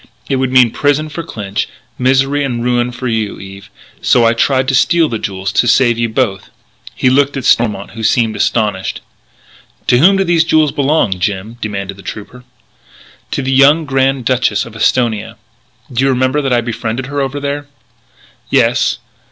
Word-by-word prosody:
It 135 - 0
would 130 -1 -1
mean 125 -3 +5
prison 145 +4 0
for 155 +3 -5
Clinch, 105 -9 -4 0.3
misery 135 +3 +2
and 120 -4 -2
ruin 120 0 +1
for 125 +1 -5
you, 110 -3 -2
Eve. 100 +1 -11 0.3
So 120 -2 +3
I 115 - +4
tried 130 +2 +1
to - - 0
steal 165 +5 +3
the 115 -5 -4
jewels... 95 -1 -4
to 120 - +1
save 120 -1 +3
you 115 0 0
both." 110 -4 -2 0.5
He - - 0
looked 140 +1 +2
at 130 - -5
Stormont, 105 -4 +1
who 115 - -8
seemed 110 0 +1
astonished. 105 -4 -1 0.8
"To 120 - +3
whom 190 +7 +5
do 195 - +2
these 170 -3 +2
jewels 155 -3 +2
belong, 135 -10 0
Jim?" 105 +5 -3
demanded 100 -2 -5
the - - -12
trooper. 115 +6 -9 0.9
"To 140 - -3
the 135 - -1
young 145 +4 +5
Grand 135 -2 0
Duchess 120 -5 +1
of 115 - -12
Esthonia.... 115 0 0 0.6
Do 125 +2 0
you 135 - +3
remember 130 +3 +1
that 135 -2 -2
I 120 -1 +3
befriended 115 +1 -4
her 140 +1 -3
over 135 +1 -3
there?" 145 +1 -4 0.8
"Yes." - - +2
125 Hz, 175 wpm, -14 LUFS, 110-135 Hz, 0.9 s, mean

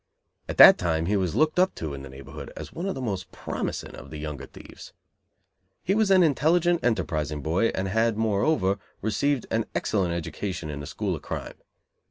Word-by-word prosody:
At - - -4
that - - +10
time 80 -2 0
he 100 +4 +1
was 95 -4 0
looked 155 +2 +2
up 185 +1 +3
to 80 -3 -5
in 70 - -7
the 70 - -9
neighborhood 65 +1 -9
as - - -8
one 175 +4 -4
of 195 - -2
the 130 - -5
most 95 -5 -4
promising - - -5
of - - -11
the 75 - -7
younger 75 -3 -6
thieves. - - -13 0.9
He 190 - +1
was 215 -1 +2
an 190 -2 +6
intelligent, 170 +3 +2
enterprising 75 - -1
boy 85 +9 +2
and 95 0 -1
had, 110 +2 +1
moreover, 105 -1 +1 0.2
received 125 +5 0
an 115 0 +1
excellent 90 -5 0
education 85 -1 -4
in 70 - -6
the 70 - -7
school - - -2
of - - -8
crime. - - -5
100 Hz, 195 wpm, -26 LUFS, -, 0.9 s, that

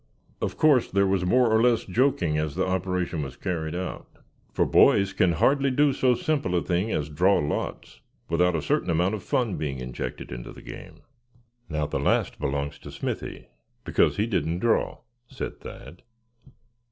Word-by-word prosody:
Of - - -2
course 145 -6 +4
there 100 0 +2
was 95 -2 +1
more 125 +3 +4
or 110 0 +4
less 120 -1 +3
joking 115 - +1
as 75 -1 -1
the 95 - +1
operation 90 -3 -1
was 65 -2 -6
carried 85 -4 -3
out; 90 +1 -5 0.4
for - - +1
boys 100 -1 +4
can 90 -2 +3
hardly 140 - +3
do 140 +2 +3
so 130 -1 +3
simple 140 - -1
a 85 - +1
thing 90 +4 0
as 75 - -1
draw 90 +7 +3
lots 75 +1 -4 0.3
without 90 +1 +2
a 80 - -2
certain - - 0
amount 90 +4 +2
of 105 - -3
fun 115 -2 -1
being 70 -3 -3
injected 65 -1 -6
into - - -7
the - - -13
game. - - -10 0.7
"Now, 75 -2 -1
the - - -2
last - - +1
belongs 70 +1 -2
to - - -10
Smithy, - - -5 0.3
because - - +2
he 105 - +2
didn't 85 -7 -1
draw," 115 +5 0 0.3
said - - -6
Thad. 85 - -11
90 Hz, 175 wpm, -26 LUFS, 80-115 Hz, 0.7 s, course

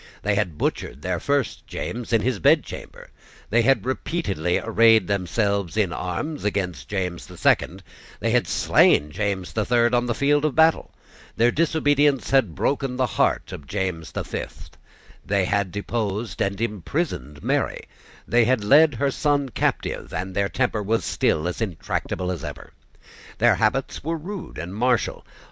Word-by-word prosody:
They 105 - +1
had 95 -7 -1
butchered 70 -1 -3
their 90 -2 -1
first 140 +3 -1
James 120 0 -5
in 115 -2 +3
his 125 -3 -1
bedchamber: - - 0 0.4
they 120 +2 +4
had 135 +3 +2
repeatedly 115 - -1
arrayed 115 -2 +4
themselves 100 0 -1
in 100 -5 +1
arms 95 - -4
against 90 -9 -2
James 90 -4 -3
the - - -12
Second; - - +1 0.4
they - - 0
had - - +2
slain 75 +1 +3
James 95 +1 -2
the 110 - 0
Third 120 +1 +2
on 120 0 +2
the 120 - -1
field 145 +1 +2
of 155 -4 0
battle: 160 0 +3 0.5
their 120 +2 +4
disobedience 145 -3 +2
had 130 - +3
broken 135 -2 -1
the 130 0 +1
heart - - 0
of 70 - -9
James 90 -4 -3
the - - -3
Fifth: - - -7 0.5
they 100 -2 +1
had 100 -1 0
deposed 105 +1 -3
and 100 0 -1
imprisoned 105 - -3
Mary: - - 0 0.5
they 120 +1 +4
had 125 -2 +1
led 150 +6 +5
her 140 +4 0
son 145 -1 0
captive; 115 - -2
and 95 +3 -4
their 100 0 0
temper 120 -4 0
was 110 +3 0
still 80 +3 +1
as 90 - -4
intractable 90 -1 -3
as 85 -5 -5
ever. - - -8 0.6
Their - - +5
habits 115 +5 0
were 165 +2 -2
rude 185 +4 -7
and 85 +4 -6
martial. 120 +3 0
110 Hz, 160 wpm, -23 LUFS, 95-130 Hz, 0.6 s, led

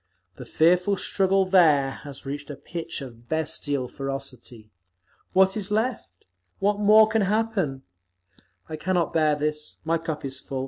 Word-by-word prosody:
The - - -9
fearful 180 +4 +3
struggle 195 0 +2
there 155 -8 +4
has 140 -2 -9
reached 145 +1 -6
a 145 - -5
pitch 165 +2 -6
of 120 -3 -11
bestial 145 -4 -1
ferocity. 130 -5 -7 0.6
What 190 0 +4
is 205 -2 -3
left? 215 - -2 0.3
What 205 +1 0
more 215 +1 +6
can 220 0 +1
happen? 200 -9 -1 0.8
I 155 - -6
cannot 175 0 0
bear 155 -2 +3
this. 150 +1 -3
My 165 +1 +1
cup 160 -3 -5
is 135 -1 -5
full. 135 -1 -6
160 Hz, 145 wpm, -25 LUFS, 140-195 Hz, 0.8 s, more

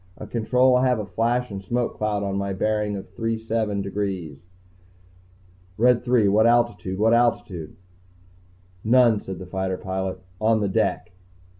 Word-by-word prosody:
"Uh, - - -8
Control, 125 +3 +2
I 130 +1 +2
have 125 -1 +2
a 105 - -4
flash 120 +3 -1
and 100 -1 -6
smoke 120 +4 -2
cloud 105 -1 -1
on 100 0 -2
a 100 0 -3
bearing 105 +1 -1
of 95 -2 -8
three 115 +3 -2
seven 110 -3 -2
degrees." 95 -5 -4 1.4
"Red 120 +1 +3
Three, 120 -4 +3
what 110 +3 +4
altitude? 120 -5 +1
What 110 +3 +3
altitude?" 105 -9 0 1.1
"None," 115 -1 +4
said 95 -2 -7
the 95 - -8
fighter 95 0 -3
pilot. 95 0 -4 0.2
"On 110 0 +2
the 100 -2 0
deck." 95 - -1
105 Hz, 155 wpm, -23 LUFS, 95-115 Hz, 1.4 s, what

